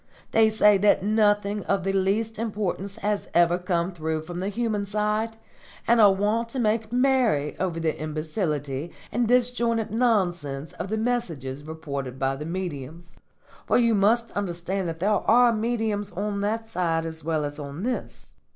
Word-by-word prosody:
They 220 -1 +5
say 210 -2 +5
that 200 -1 +4
nothing 205 -1 +2
of 195 - 0
the 195 +1 0
least 210 +3 0
importance 200 -3 -3
has 205 0 -2
ever 175 +1 +4
come 180 -1 -1
through 160 -2 -3
from 175 +2 -6
the 190 +2 -2
human 220 -1 -1
side, 210 +2 -1 0.5
and 235 0 +5
are 205 -2 +8
wont 210 +4 0
to 260 - -4
make 220 -1 0
merry 250 - +2
over 180 -3 -1
the 160 -1 0
imbecility 155 -1 -3 0.2
and 240 +2 +1
disjointed 235 -2 +1
nonsense 175 - 0
of 180 - -5
the 220 +3 -2
messages 165 - -2
reported 140 -5 -5
by 135 0 0
the 150 +2 -6
mediums; 170 -2 -6 0.5
for - - +4
you 235 -2 +3
must 225 +3 +2
understand 185 -1 -3
that 165 0 -6
there 205 +3 +2
are 235 +3 +4
mediums 220 -2 -1
on 200 +2 -2
that 225 +2 -1
side 165 -6 -1
as 160 -1 -6
well 155 -1 0
as 145 +1 -6
on 145 +4 -6
this. 250 +1 -5
200 Hz, 165 wpm, -25 LUFS, 165-220 Hz, 0.5 s, are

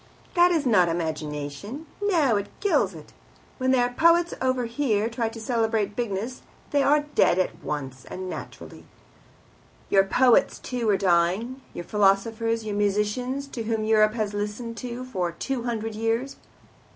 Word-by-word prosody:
That 350 0 +5
is 325 -5 +1
not 185 -8 +4
imagination. 160 - -4 0.2
No, 330 - +3
it 200 0 -1
kills 290 - +1
it. 155 - -13 0.5
When 260 0 +1
their 245 -2 +3
poets 335 +4 +4
over 255 -1 +1
here 230 -3 0
try 230 -1 -2
to 225 - -9
celebrate 220 -3 0
bigness 230 +1 -3 0.3
they 285 - +3
are 290 +2 +4
dead - - +4
at 185 - -1
once, 135 -3 -5
and 185 0 -6
naturally. - - -8 1.1
Your 195 - +6
poets 250 +6 +3
too 245 -3 -3
are 200 - +4
dying, 190 +8 +1
your 175 - -5
philosophers, 220 +3 +1
your 210 -1 -3
musicians, 210 +7 0
to 240 - -5
whom 220 -1 -1
Europe 215 0 +3
has 215 -3 -2
listened 210 +3 -4 0.3
for 180 -8 -2
two 245 - -3
hundred 225 -2 -3
years. 225 +5 -1
225 Hz, 150 wpm, -25 LUFS, 195-255 Hz, 1.1 s, Your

